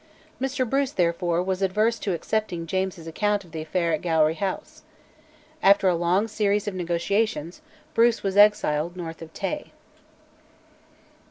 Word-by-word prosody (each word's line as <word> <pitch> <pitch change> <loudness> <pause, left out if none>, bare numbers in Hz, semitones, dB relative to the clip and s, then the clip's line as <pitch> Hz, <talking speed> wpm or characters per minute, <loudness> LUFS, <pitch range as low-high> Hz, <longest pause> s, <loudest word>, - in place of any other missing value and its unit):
Mr 265 -1 -1
Bruce, 275 +2 0
therefore, 175 0 +1
was 190 0 -2
averse 215 +4 +1
to 200 - -2
accepting 180 -1 -2
James's 185 -1 -2
account 205 +5 0
of 170 - -18
the 160 -1 -5
affair 170 +1 -1
at 155 - -1
Gowrie 160 -2 +2
House. 190 +2 -4 0.8
After 200 -3 +5
a 180 - +4
long 175 +5 +1
series 210 -1 0
of 205 - -2
negotiations 180 - -1 0.3
Bruce 230 -2 +3
was 195 -1 -1
exiled 175 -5 +3
north 165 -2 -7
of 160 -1 -9
Tay. 295 - -4
190 Hz, 145 wpm, -25 LUFS, 170-210 Hz, 0.8 s, After